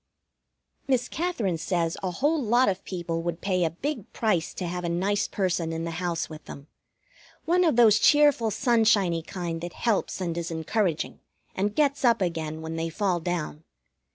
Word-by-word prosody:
Miss 255 -3 +1
Katherine 235 - -2
says 165 0 -1
a 185 - -1
whole 290 - +1
lot 245 +2 +3
of 190 -1 -1
people 170 -3 -3
would 170 0 -3
pay 185 -2 0
a 165 - +2
big 230 - -5
price 190 -8 0
to 185 - -4
have 180 +1 -4
a 170 - -1
nice 195 +4 0
person 180 -4 -1
in 165 0 -3
the 170 - -3
house 170 -2 -1
with 155 -1 -11
them 140 - -10 0.8
one 355 +2 +3
of 320 -7 +3
those 220 -3 +6
cheerful, 290 -4 +5
sunshiny 215 -7 +2
kind 170 -1 -5
that 175 0 -6
helps 225 -5 -1
and 175 -3 -2
is 170 - -4
encouraging, 165 +1 -1 0.3
and 205 +2 -1
gets 285 -2 +1
up 235 -2 +4
again 160 -3 -3
when 160 0 -5
they 165 0 -2
fall 185 0 0
down. 165 -2 -3
185 Hz, 180 wpm, -26 LUFS, 165-225 Hz, 0.8 s, those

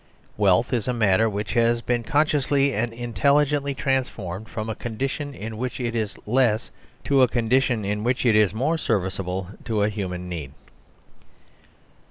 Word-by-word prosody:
Wealth 105 +5 +3
is 120 -2 0
matter 110 -3 +3
which 105 0 -3
has 115 0 +2
been 120 -1 0
consciously 140 0 +2
and 115 +2 -1
intelligently 140 +4 +1
transformed 110 -7 -2
from 110 -2 -4
a 110 - -2
condition 135 +6 -4
in 110 +1 -6
which 125 +1 -3
it 120 -2 -2
is 110 -3 -2
less 120 -1 +1 0.3
to 140 -1 +3
a 130 - +6
condition 120 -2 +1
in 105 +1 -2
which 125 +2 0
it 115 -3 +4
is 105 -3 +4
more 135 +10 0
service 95 -9 -1
able 95 0 -3 0.2
to 110 -4 0
a 105 - +2
human 90 -4 -4
need. 80 -6 -6
115 Hz, 160 wpm, -24 LUFS, 105-130 Hz, 0.3 s, a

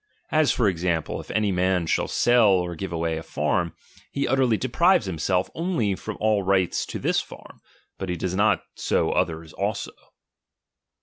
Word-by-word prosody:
As 155 -3 +3
for 115 - +2
example, 85 -3 -1
if - - -16
any 105 -2 +1
man 90 -1 +1
shall - - 0
sell 120 -2 +4
or 90 -2 +1
give 95 +2 -6
away 80 -1 -1
a - - -7
farm, 85 +1 -1 0.4
he 140 - -1
utterly 130 -3 +2
deprives 130 - +2
him 85 -4 -4
self 90 +2 +1
only 165 - 0
from 110 +3 -6
all 105 -1 +2
right 95 -2 +2
to - - -3
this - - +1
farm; - - -14 0.4
but 95 - -4
he 90 - -1
does 90 +1 -3
not 105 +2 +2
so - - 0
others 80 0 -2
also. - - -3
95 Hz, 175 wpm, -24 LUFS, 90-115 Hz, 0.4 s, sell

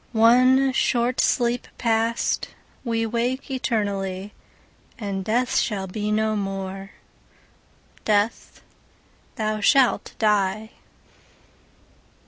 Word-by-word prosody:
One 255 +4 +5
short 245 -1 +1
sleep 240 0 +1
past, 230 0 0 0.4
we 230 -2 -1
wake 240 +4 -2
eternally, 200 -6 -2 0.6
And 200 -3 -4
Death 240 +5 0
shall 200 -4 0
be 210 +3 -3
no 215 0 +1
more: 195 -1 -5 1.1
Death, 210 +1 -1 0.7
thou 215 -3 -2
shalt 260 +3 +3
die! 210 0 +1
220 Hz, 85 wpm, -23 LUFS, 205-240 Hz, 1.1 s, One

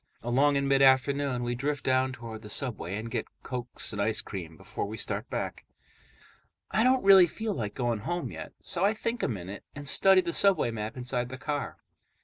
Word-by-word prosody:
Along 135 +5 +3
in 140 0 +1
mid 135 0 +3
afternoon, 135 -1 +3
we 120 0 -1
drift 140 +3 -2
down 130 0 +2
toward 115 -4 -8
the 105 - -10
subway 105 -6 -2
and 110 +2 -5
get - - -2 0.2
cokes 125 -3 -3
and 105 - -2
ice 110 +1 +1
cream 85 -5 -6
before - - -5
we 110 +2 -6
start - - -3
back. - - -4 1.1
I 220 - +3
don't 255 +1 +3
really 190 -2 +8
feel 220 +5 -3
like 105 - -4
going 120 -3 -1
home 175 +10 -3
yet, - - -8
so 180 -1 -1
I 205 +2 +3
think 230 +2 -2
a - - +1
minute 100 -3 -6
and 145 0 -7
study 190 +5 +6
the 170 -2 -3
subway 190 -12 +3
map 110 +1 -5
inside 125 -1 -2
the 130 - -7
car. 145 +1 -3
130 Hz, 200 wpm, -28 LUFS, 115-155 Hz, 1.1 s, really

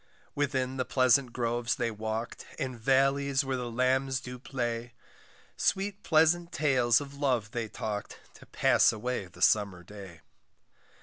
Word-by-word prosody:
Within 135 -2 -1
the 130 - 0
pleasant 130 0 +3
groves 120 0 -1
they 120 -1 -1
walk'd, 110 +2 -4
And 130 -4 -3
vallies 135 +2 +2
where 135 -1 -1
the 125 -1 -4
lambs 130 +2 +1
do 125 -1 -9
play, 120 -2 -4 0.6
Sweet 200 +1 0
pleasant 170 +1 +3
tales 130 -4 +3
of 140 -1 -8
love 130 -7 -1
they 120 -2 -3
talk'd, 105 -1 -5 0.2
To - - -16
pass - - +4
away 110 -2 -3
the 90 0 -6
summer 100 -4 +2
day. 95 -4 -11
125 Hz, 140 wpm, -29 LUFS, 115-135 Hz, 0.6 s, pass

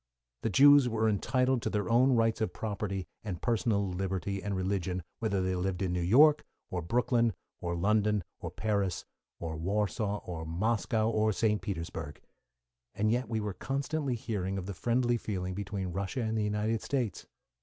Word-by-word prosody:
The - - 0
Jews 140 +3 +7
were 110 -1 +1
entitled 125 +4 +1
to - - -1
their 105 -2 -1
own 125 +3 +4
rights 115 -2 +2
of 105 -5 -1
property 100 -3 -3 0.2
and 95 -6 -4
personal 110 -3 +1
liberty 95 +1 -2
and 100 +1 -2
religion, 95 -1 -1 0.2
whether 100 -4 0
they 95 0 0
lived 90 +1 -1
in 90 -2 0
New 90 - 0
York, 145 - +6 0.3
or 90 - -2
Brooklyn, 115 +4 +2 0.3
or 85 -1 -2
London, 105 +2 +2 0.2
or - - -5
Paris, 100 -5 -1 0.3
or 80 -2 -4
Warsaw, 105 +3 -1
or 85 -3 -5
Moscow, 110 +5 0
or 110 -1 +2
St. 105 +1 +1
Petersburg. 85 -5 -5 0.8
And 110 +1 +1
yet 120 -1 0
we 110 -2 0
were 105 -2 -3
constantly 140 - -2
hearing 100 -4 -3
of 95 - -4
the 100 - -4
friendly 120 +5 +1
feeling 95 -5 -3
between 100 -1 -4
Russia 100 +8 -3
and 110 0 -1
the 110 - +1
United 105 +2 0
States. 125 -9 -2
105 Hz, 170 wpm, -31 LUFS, 95-115 Hz, 0.8 s, Jews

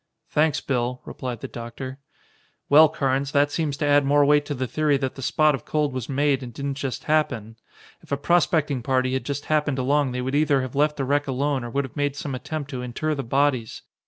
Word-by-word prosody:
"Thanks, 150 0 +2
Bill," 125 -1 -1
replied 125 -3 -6
the - - -5
doctor. 130 +3 -7 0.7
"Well, 155 +2 +8
Carnes, 135 -2 -1
that 145 0 +3
seems 150 -3 -1
to 145 - -1
add 145 0 +4
more 145 +1 +4
weight 145 0 +4
to 145 - -2
the 130 0 -2
theory 145 +3 +1
that 135 -1 -2
the 135 - -9
spot 155 +3 +3
of 135 - -4
cold 150 -3 -1
was 130 -3 -5
made 140 0 +1
and 125 -2 -7
didn't 140 +4 -4
just 135 -2 -4
happen. 130 -8 0 0.5
If - - -20
a 140 - +1
prospecting 155 -3 +2
party 130 0 +1
had 130 - -2
just 145 0 -4
happened 150 -3 +1
along 140 +1 +1
they 125 0 -3
would 130 +2 -3
either 145 -2 +3
have 130 - -6
left 150 +1 +1
the 135 - -1
wreck 145 +2 +1
alone 135 0 -1
or 120 - -5
would 140 +4 0
have 130 - -12
made 145 -1 -1
some 145 -1 -5
attempt 145 +3 -5
to 130 -2 -4
inter 125 +6 -2
the 140 - -2
bodies. 135 -2 0
140 Hz, 225 wpm, -24 LUFS, 130-145 Hz, 0.7 s, Well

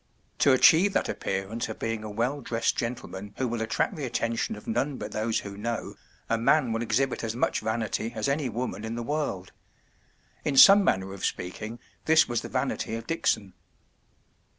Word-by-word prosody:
To 140 - +5
achieve 165 +9 +6
that - - 0
appearance 100 +5 -3
of 110 - -6
being 115 -1 -3
a 110 - -6
well 120 +7 -1
dressed 115 -2 0
gentleman 105 -4 -5
who 130 - 0
will 115 -1 -3
attract 110 - 0
the 140 -5 -4
atten¬ 115 0 -1
tion 115 - -1
of 105 - -12
none 130 +5 -1
but - - -6
those 110 +1 -1
who 100 -1 -8
know, 115 +3 -4 0.3
a 115 - 0
man 135 +1 +3
will 115 +1 -1
exhibit 130 +3 0
as 115 0 -3
much 125 - +1
vanity 110 0 -2
as 110 -1 -1
any 140 -1 0
woman 120 -1 -4
in 110 +1 -4
the 120 - -4
world. 130 -9 -3 0.9
In 140 -3 -1
some 200 +7 +9
manner 95 - 0
of 100 - -9
speaking, 110 +6 -4 0.3
this 160 0 +5
was 120 -1 -1
the - - -7
vanity 110 - -2
of 115 0 -6
Dickson. 110 - -1
115 Hz, 190 wpm, -27 LUFS, 110-135 Hz, 0.9 s, some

